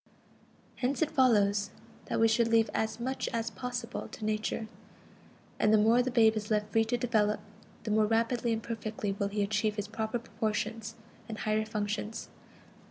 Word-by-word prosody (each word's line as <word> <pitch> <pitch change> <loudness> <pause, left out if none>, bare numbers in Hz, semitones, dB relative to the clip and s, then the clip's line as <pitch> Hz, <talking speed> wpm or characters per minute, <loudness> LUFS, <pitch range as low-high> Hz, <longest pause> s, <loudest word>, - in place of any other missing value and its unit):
Hence 265 +4 +1
it 315 - -2
follows 205 -6 +3 0.4
that - - -2
we 225 - +6
should 225 +1 +3
leave 230 -1 +3
as 220 +1 -1
much 260 +3 -2
as 230 0 -2
possible 245 -1 -5
to 215 - -7
Nature; 215 +1 -1 0.9
and 215 - +4
the 220 - +6
more 225 +3 +5
the 250 - -1
babe 225 -3 +5
is 210 -1 -3
left 210 -1 0
free 225 +1 +3
to 240 +2 0
develop, 220 -3 +1 0.4
the 215 - -2
more 215 0 +4
rapidly 230 +2 +1
and 225 -1 -1
perfectly 215 -2 -3
will 200 0 -1
he 205 0 -1
achieve 215 +1 0
his 205 -1 -3
proper 220 +2 -2
proportions 225 -1 -3 0.3
and 220 - -5
higher 215 0 0
functions. 210 0 -3
220 Hz, 170 wpm, -30 LUFS, 210-230 Hz, 0.9 s, we